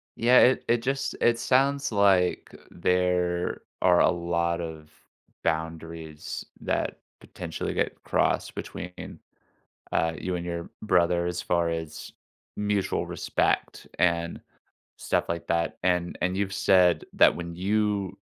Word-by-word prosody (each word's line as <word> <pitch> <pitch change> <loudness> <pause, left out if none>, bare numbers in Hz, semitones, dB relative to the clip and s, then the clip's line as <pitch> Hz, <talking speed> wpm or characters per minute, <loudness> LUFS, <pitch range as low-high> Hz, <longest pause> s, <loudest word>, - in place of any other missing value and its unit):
Yeah. 120 +2 +5
It 130 +1 +4
it 120 0 +2
just 135 +3 -2
it 120 0 +4
sounds 140 +1 +2
like 100 -3 +2 0.2
there 90 0 0 0.2
are 90 -1 +5
a - - +5
lot 85 -1 -1
of 80 -2 -7 0.5
boundaries 80 -1 -4 0.2
that - - -2 0.2
potentially - - -5
get - - -2
crossed - - 0
between, 90 +1 -7 0.7
uh, 80 0 +1
you 90 +3 -3
and 85 0 -4
your 85 -1 -4
brother 85 -3 +2
as 90 0 -3
far 85 -1 +1
as 80 -2 -5 0.4
mutual 105 -1 0
respect - - -1
and 85 -1 +1 0.6
stuff - - -1
like 85 0 -3
that. 85 0 0
And 90 -1 0
and 90 +1 0
you've 100 -1 -1
said 90 -3 +4
that - - +5
when 85 -1 -6
you 100 +1 0
90 Hz, 130 wpm, -27 LUFS, 85-100 Hz, 0.7 s, Yeah